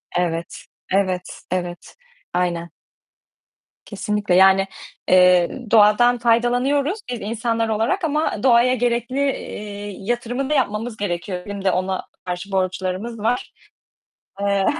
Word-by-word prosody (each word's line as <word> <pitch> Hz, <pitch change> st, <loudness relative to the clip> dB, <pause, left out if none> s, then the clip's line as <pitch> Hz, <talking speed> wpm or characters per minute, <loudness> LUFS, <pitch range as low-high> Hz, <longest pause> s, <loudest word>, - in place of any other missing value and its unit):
Evet. 170 Hz, -1 st, -2 dB, 0.3 s
Evet. 185 Hz, -2 st, -1 dB
Evet. 175 Hz, -1 st, -4 dB, 0.4 s
Aynen. 170 Hz, -1 st, -1 dB, 1.2 s
Kesinlikle, 205 Hz, -2 st, -1 dB
yani, 190 Hz, +1 st, +6 dB, 0.4 s
eee, 180 Hz, +6 st, +4 dB
doğadan 230 Hz, +3 st, +5 dB
faydalanıyoruz 245 Hz, -, +1 dB
biz 245 Hz, -2 st, -4 dB
insanlar 230 Hz, +1 st, -1 dB
olarak 220 Hz, +8 st, 0 dB
ama 305 Hz, -8 st, -1 dB
doğaya 250 Hz, 0 st, +5 dB
gerekli, 240 Hz, +1 st, -1 dB
eee, 205 Hz, -7 st, -3 dB
yatırımı 240 Hz, +5 st, -2 dB
da -, -, +1 dB
yapmamız 225 Hz, -4 st, -1 dB
gerekiyor. 180 Hz, -1 st, -3 dB
Bizim 200 Hz, -1 st, -6 dB
de 190 Hz, -, +4 dB
ona 185 Hz, +1 st, -2 dB, 0.2 s
karşı 180 Hz, +2 st, -5 dB
borçlarımız 190 Hz, +4 st, -2 dB
var. 235 Hz, +4 st, -1 dB, 0.9 s
Eee, 200 Hz, -1 st, +1 dB
210 Hz, 110 wpm, -21 LUFS, 185-240 Hz, 1.2 s, yani